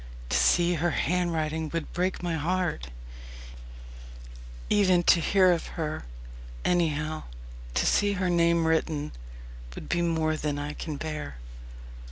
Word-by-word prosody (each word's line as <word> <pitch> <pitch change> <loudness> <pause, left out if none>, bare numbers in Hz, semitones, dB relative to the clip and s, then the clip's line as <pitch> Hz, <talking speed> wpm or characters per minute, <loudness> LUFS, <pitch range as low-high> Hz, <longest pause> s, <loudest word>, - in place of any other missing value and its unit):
To - - +2
see 175 0 +4
her 175 +1 +1
handwriting 160 -3 -1
would 165 -1 -4
break 180 +1 -1
my 175 -1 -1
heart 165 - -1 1.8
even 185 -4 +3
to 175 - +5
hear 185 +2 +4
of 170 -2 -1
her 155 - -3 0.6
anyhow, 155 -3 0 0.5
to - - +2
see 205 0 +3
her 185 -1 -1
name 170 -1 +3
written, 160 -2 0 0.6
would - - -8
be 175 - +1
more 160 -2 +1
than 150 -1 -2
I 145 +1 -4
can 155 -2 -5
bear. 150 - -5
165 Hz, 130 wpm, -27 LUFS, 155-175 Hz, 1.8 s, to